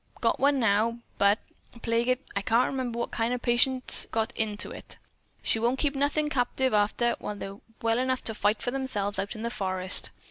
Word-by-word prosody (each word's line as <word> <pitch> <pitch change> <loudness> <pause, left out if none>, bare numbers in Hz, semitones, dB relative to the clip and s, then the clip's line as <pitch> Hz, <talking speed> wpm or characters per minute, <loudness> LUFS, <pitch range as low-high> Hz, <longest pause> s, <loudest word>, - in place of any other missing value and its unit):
Got - - +1
one 280 0 +3
now, 225 +1 +2 0.2
but, 200 +1 +5 0.5
plague 230 +1 +1
it, 255 0 +1
I 200 - 0
can't 230 +5 +3
remember 255 -3 -3
what 235 - -2
kind 230 +2 0
of 245 - -6
patients 255 +2 +3
she's - - -5
got 225 +2 -1
into 210 -2 -2
it. - - -8 0.5
She 225 - +3
won't 240 +3 +1
keep 285 0 0
nothin' 290 +2 +1
captive 260 -2 0
arter 215 +3 +2
they're 200 -1 -6 0.3
well 230 +1 +2
enough 255 0 0
to 225 - -1
fight 210 0 +1
for 245 - -1
themselves 215 -7 0
out 200 +4 -3
in 220 - -6
the 235 - -2
forest. 185 -3 +1
235 Hz, 200 wpm, -28 LUFS, 210-255 Hz, 0.5 s, but